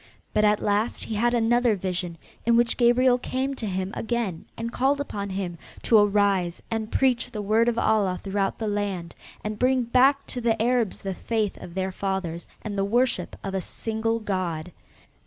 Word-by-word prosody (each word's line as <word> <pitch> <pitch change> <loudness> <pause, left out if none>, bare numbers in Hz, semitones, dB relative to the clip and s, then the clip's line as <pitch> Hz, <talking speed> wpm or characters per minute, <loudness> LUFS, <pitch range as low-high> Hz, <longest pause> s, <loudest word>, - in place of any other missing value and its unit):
But 210 - +3
at 210 0 +3
last 210 +3 0
he - - -4
had 240 +3 +2
another 240 0 +3
vision 180 -2 -3 0.3
in 235 0 +4
which 240 0 +3
Gabriel 245 +1 +4
came 260 +2 -2
to 230 -5 -5
him 190 0 -2
again 225 -7 -2
and 230 +1 -4
called 275 +2 +2
upon 200 -8 -4
him 185 -3 -4 0.2
to 225 - +6
arise 200 -4 +2
and 220 -1 -2
preach 255 -2 +2
the 215 -3 -5
word 220 +3 +3
of 235 - -2
Allah 205 -5 +2
throughout 195 0 -1
the 220 - -3
land 200 -5 -2 0.3
and 210 0 -4
bring 255 0 +3
back 265 +4 +4
to 245 - -5
the 225 -1 +1
Arabs 235 -2 +1
the 195 -1 -2
faith 215 +1 -1
of 170 - -9
their 190 0 -1
fathers 185 -3 -3 0.2
and 210 -2 -4
the - - +2
worship 230 -3 +1
of 195 - -4
a 190 - 0
single 225 +3 -2
god. 180 -6 -3
215 Hz, 185 wpm, -25 LUFS, 195-235 Hz, 0.3 s, to